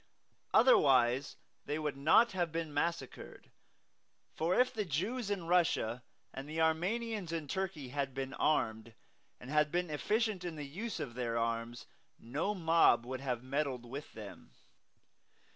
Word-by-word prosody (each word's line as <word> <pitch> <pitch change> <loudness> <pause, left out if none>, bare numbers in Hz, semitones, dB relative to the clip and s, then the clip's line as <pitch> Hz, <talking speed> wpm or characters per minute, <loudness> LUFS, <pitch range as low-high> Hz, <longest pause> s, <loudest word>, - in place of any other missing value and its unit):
Otherwise 135 - +4 0.3
they 145 - -1
would 150 -2 -2
not 155 +12 +5
have 175 -3 -1
been 165 -2 -3
massacred; 155 -2 -4 0.8
for 170 +6 +1
if 255 0 +3
the 215 - -1
Jews 200 - -2
in 195 -4 -2
Russia 165 -9 +1 0.3
and 135 +2 -7
the 160 +1 -4
Armenians 185 +4 0
in 160 -3 -3
Turkey 175 -6 -3
had 140 -1 -3
been 135 0 -4
armed, 110 -7 0 0.4
and 125 - -9
had 150 0 +3
been 175 -2 -1
efficient 210 +5 0
in 175 -2 -4
the 150 -1 -6
use 200 +9 -5
of 140 -6 -5
their 120 -2 -2
arms, 115 +1 -2 0.3
no 150 - -2
mob 165 -9 +4
would 130 +1 -5
have 125 -3 -2
meddled 135 -2 -2
with 140 +5 -7
them. 105 -2 -11
150 Hz, 145 wpm, -33 LUFS, 130-180 Hz, 0.8 s, not